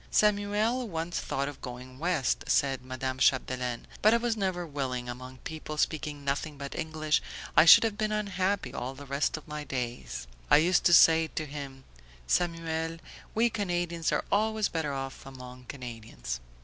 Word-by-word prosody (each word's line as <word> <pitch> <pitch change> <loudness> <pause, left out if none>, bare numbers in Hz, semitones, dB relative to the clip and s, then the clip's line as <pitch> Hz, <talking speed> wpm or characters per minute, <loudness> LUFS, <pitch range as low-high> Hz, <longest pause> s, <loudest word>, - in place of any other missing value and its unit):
"Samuel 210 +4 +2
once 165 0 -2
thought 140 +1 -2
of 145 - -8
going 125 +1 -8
West," 165 -5 0
said 135 -2 +2
Madame 130 0 -4
Chapdelaine, 125 -2 +1 0.2
"but 215 +2 +6
I - - +5
was 235 -1 0
never 185 -4 -1
willing. 130 -5 -3
Among 130 +1 -7
people 155 -1 -6
speaking 150 -2 -1
nothing 145 +2 -2
but 140 0 -6
English 155 -1 0 0.3
I - - +8
should 165 - +10
have 220 -2 -1
been 215 -1 0
unhappy 195 -8 -1
all 130 0 -4
the 145 +1 -10
rest 140 +4 0
of 155 - -12
my 150 0 -5
days. 125 - -4 0.2
I 145 - +8
used 175 +3 +3
to 175 - +6
say 160 0 +7
to 155 0 -4
him 140 -2 -8 0.4
'Samuel, 165 - 0 0.4
we 230 +1 +3
Canadians 175 -5 -1
are - - 0
always 215 +1 +2
better 160 -3 -2
off 135 -1 -5
among 125 -1 -10
Canadians.'" 115 - -6
150 Hz, 165 wpm, -29 LUFS, 130-175 Hz, 0.4 s, should